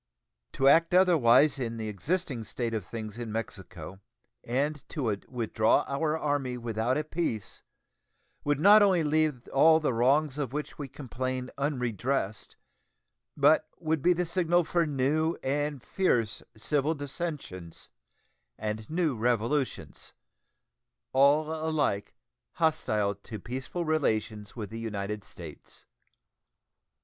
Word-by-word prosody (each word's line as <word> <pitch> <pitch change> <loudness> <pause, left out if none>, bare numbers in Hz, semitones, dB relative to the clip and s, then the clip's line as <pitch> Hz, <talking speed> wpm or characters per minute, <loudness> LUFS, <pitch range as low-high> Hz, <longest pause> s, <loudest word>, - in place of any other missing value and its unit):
To 135 - +2
act 165 +4 +5
otherwise 150 -6 +5
in 115 -2 -3
the 110 -1 -4
existing 130 - -2
state 115 +1 -3
of 110 -3 -2
things 110 +3 -7
in 115 -2 -5
Mexico, 95 -5 -6 0.4
and 140 +4 -1
to 120 -9 -1
withdraw 110 -3 +2
our 150 +3 0
Army 145 -5 -1
without 115 +2 -1
a 155 - 0
peace, 155 - -3 0.8
would 145 -1 +1
not 205 +6 +8
only 190 -5 +4
leave 150 -4 0
all 160 +3 +5
the 150 -5 0
wrongs 135 +5 +2
of 135 -3 -3
which 150 0 -5
we 145 - -4
complain 130 -1 -4
unredressed, 125 -5 -2 0.8
but 145 +2 +4
would 160 -2 -1
be 180 +4 +4
the 175 +1 -1
signal 175 0 +2
for 170 0 +1
new 150 +4 +1
and 145 0 -1
fierce 120 - 0 0.2
civil 145 +6 0
dissensions 145 - -6 0.7
and 110 0 -4
new 160 -4 0
revolutions 120 +4 -1 1.0
all 145 +4 +4
alike 155 -10 -1 0.4
hostile 110 -11 +1
to 105 +2 -9
peaceful 130 +10 -5
relations 110 -9 -1
with 110 -4 -6
the 115 - -6
United 105 -2 -4
States. 80 -6 -12
135 Hz, 120 wpm, -29 LUFS, 115-155 Hz, 1.0 s, not